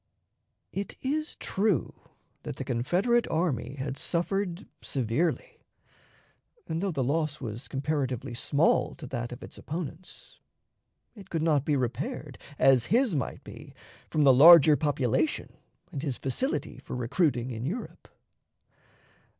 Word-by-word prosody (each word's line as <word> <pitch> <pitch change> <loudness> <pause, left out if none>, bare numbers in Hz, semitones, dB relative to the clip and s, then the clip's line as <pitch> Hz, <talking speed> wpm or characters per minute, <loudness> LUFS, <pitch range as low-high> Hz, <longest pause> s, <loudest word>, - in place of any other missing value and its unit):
It 200 0 -4
is 305 +4 -2
true 195 - 0 0.5
that - - -6
the - - -5
Confederate 180 - +1
army 140 -6 -1
had 135 0 -4
suffered 180 +4 -1 0.2
severely, 135 +6 -2 1.1
and, 160 +1 -2
though 200 - 0
the 140 -5 -1
loss 150 +2 -1
was 120 0 -6
comparatively 135 -3 -2
small 145 +6 +1
to 165 - -9
that 120 -2 -4
of 125 - -8
its - - -10
opponents, 165 +2 -8 0.7
it 200 -4 -13
could 165 -2 -1
not 150 -4 +2
be 150 - +2
repaired, 125 -2 -3 0.2
as 130 -3 +5
his 240 -2 +3
might 135 -6 -3
be, - - -12 0.3
from 155 - +2
the 135 -2 +7
larger 155 +2 +9
population 145 -1 0 0.4
and 135 - -4
his 140 -5 -2
facility 195 - -2
for - - -7
recruiting 125 0 0
in 115 -1 -5
Europe. 190 - -5
145 Hz, 130 wpm, -28 LUFS, 130-175 Hz, 1.1 s, larger